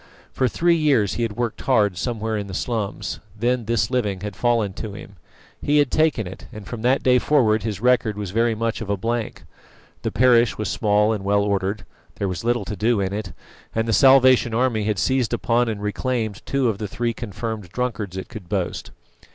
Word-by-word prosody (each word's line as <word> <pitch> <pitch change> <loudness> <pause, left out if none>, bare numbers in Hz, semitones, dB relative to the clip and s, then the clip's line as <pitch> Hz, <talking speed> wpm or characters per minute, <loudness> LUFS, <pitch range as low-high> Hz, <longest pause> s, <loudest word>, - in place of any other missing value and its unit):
For 130 - +1
three 170 +8 +2
years 135 - +2
he - - -3
had 115 -2 -1
worked 120 -2 -3
hard 105 -8 +2
somewhere 110 +1 -2
in 100 -1 -3
the 95 - -6
slums; 105 -3 -3 0.2
then 120 +1 0
this 115 +2 0
living 105 -7 -1
had 105 -1 -5
fallen 115 -5 +1
to 105 +1 -6
him. 100 -1 -11 0.4
He 145 +1 +2
had 145 -3 +3
taken 155 -9 +2
it, 90 +1 -9
and 105 -2 -9
from 115 +2 -6
that 125 +3 +2
day 125 -1 +5
forward 120 -7 +3
his 105 -3 -4
record 120 -4 +2
was 100 -3 -4
very 115 +2 +1
much 115 +1 -2
of 110 - -6
a 100 - 0
blank. 115 +3 -3 0.6
The - - -2
parish 120 -2 +4
was 105 -2 -2
small 105 +1 +2
and 105 -3 -4
well 100 +1 +2
ordered; 100 0 -1 0.3
there 100 - -2
was 90 0 -4
little 120 +1 0
to 105 - -4
do 110 +3 +1
in 95 0 -1
it, 105 -2 -4 0.4
and 115 0 0
the 115 - +1
Salvation 130 -1 +5
Army 115 -3 +1
had 105 -1 0
seized 130 +4 +1
upon 120 0 +1
and 105 -2 -4
reclaimed 110 0 -2
two 140 -2 +1
of 105 -3 -1
the 105 - -3
three 120 +3 -2
confirmed 110 -3 -5
drunkards 105 -4 -3
it 95 - -5
could 95 -5 -10
boast. 95 -4 -2
110 Hz, 210 wpm, -22 LUFS, 105-120 Hz, 0.6 s, day